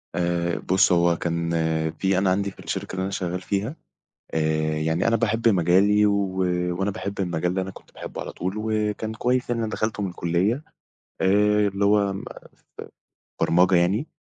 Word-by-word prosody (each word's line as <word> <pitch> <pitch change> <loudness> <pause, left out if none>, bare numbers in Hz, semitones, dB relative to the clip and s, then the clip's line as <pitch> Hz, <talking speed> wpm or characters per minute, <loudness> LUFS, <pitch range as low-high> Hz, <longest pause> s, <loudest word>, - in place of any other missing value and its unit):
آآ 85 -1 0
بُص، 95 0 +3
هو 85 -1 +3
كان 85 -1 -2 0.4
في 95 +1 0
أنا 95 -1 +2
عندي 100 +1 0
في - - -22
الشركة - - -5
اللي 95 - -2
أنا 95 - -3
شغّال 90 -1 -3
فيها، 100 - -2 0.6
آآ 80 0 0
يعني 80 +6 0
أنا 115 - +3
باحب 115 +1 +1
مجالي، 100 +3 +4
و 100 -2 0 0.4
وأنا 95 +1 0
باحب 100 +1 -5
المجال 90 0 -1
ده، 95 - 0
أنا 95 - -5
كنت - - -16
باحبه - - -7
على - - -6
طول، 95 +2 -4
وكان 110 0 -2
كويس 125 +2 0
يعني، 115 -1 0
أنا 110 - -3
دخلته 110 -1 -2
من 95 - -1
الكلّية، 90 - 0 0.6
آآ 105 +2 +3
اللي 100 +1 -1
هو 100 -1 +3
ما 95 - -6 0.5
ف - - -5 0.6
برمجة 90 +2 +4
يعني، 95 - +2
95 Hz, 175 wpm, -24 LUFS, 85-105 Hz, 0.6 s, مجالي